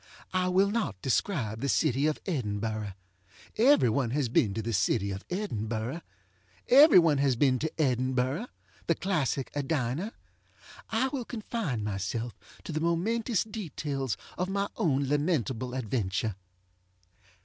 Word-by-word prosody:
I 185 0 +1
will 190 +2 +3
not 210 - -1
describe 120 - 0
the 140 - -1
city 140 +1 +2
of 155 - -1
Edinburgh. 110 - -2 0.6
Every 260 - +5
one 120 +1 +1
has 135 0 0
been 110 -3 +3
to 110 - -1
the 115 +1 -2
city 100 0 +1
of 95 +1 -5
Edinburgh. 120 - -3 0.7
Every 285 - +8
one 160 -5 +5
has 135 -2 +3
been 130 0 +3
to 160 - -1
EdinburghŌĆöthe 130 - 0 0.5
classic 150 -8 -1
Edina. 145 - -1 0.8
I 240 +4 +1
will 265 -2 -3
confine 215 - -3
myself 105 +4 -3 0.3
to - - -6
the 155 0 -2
momentous 210 +7 +1
details 150 - -4 0.2
of 180 +1 0
my 200 +1 -1
own 140 - +1
lamentable 135 -5 0
adventure. 110 -4 -1
140 Hz, 130 wpm, -29 LUFS, 115-185 Hz, 0.8 s, Every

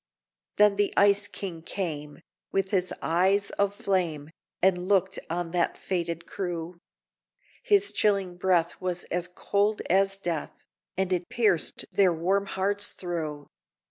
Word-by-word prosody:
Then 210 -1 +5
the 205 -1 +2
Ice 205 0 +4
King 180 -5 -6
came, 155 -4 -5 0.3
with 195 0 0
his 185 -3 +1
eyes 190 +4 +2
of 200 0 +2
flame, 165 -7 -1 0.3
And 180 -1 +2
looked 190 -1 +2
on 170 0 -2
that 175 -1 0
fated 170 -2 -3
crew; 175 -2 -5 0.8
His 405 -1 +3
chilling 195 -4 +1
breath 175 -2 +1
was 180 -1 -2
as 175 0 0
cold 205 +4 0
as 195 +1 +3
death, 170 -5 -4 0.3
And 190 -1 +1
it 175 -1 -2
pierced 210 -9 +1
their 195 -3 +4
warm 190 +4 0
hearts 200 +2 0
through! 155 -5 -5
185 Hz, 135 wpm, -27 LUFS, 170-200 Hz, 0.8 s, Then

